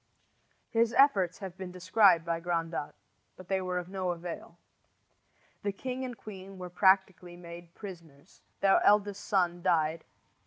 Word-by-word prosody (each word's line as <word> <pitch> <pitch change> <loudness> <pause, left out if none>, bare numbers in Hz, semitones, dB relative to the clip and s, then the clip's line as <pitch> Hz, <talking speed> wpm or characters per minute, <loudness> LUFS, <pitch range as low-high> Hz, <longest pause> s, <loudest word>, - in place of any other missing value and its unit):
His 230 0 +2
efforts 200 - +4
have 190 -3 -7
been 190 -2 -6
described 185 -1 +4
by 170 -1 -1
Grandat; 165 -3 -3 0.4
but 185 -1 -13
they 190 -1 +1
were 180 -1 -2
of 180 -1 -4
no 185 -1 -3
avail. 170 0 -6 1.0
The 205 - -1
king 255 +6 -5
and 250 -3 -5
queen 195 -2 -10
were 180 -1 -7
practically 190 -2 +2
made 170 0 -11
prisoners. 170 -6 -12 0.2
Their 195 -1 +5
eldest 205 -1 +3
son 175 -3 +1
died. 165 -3 +1
185 Hz, 145 wpm, -30 LUFS, 170-195 Hz, 1.0 s, Their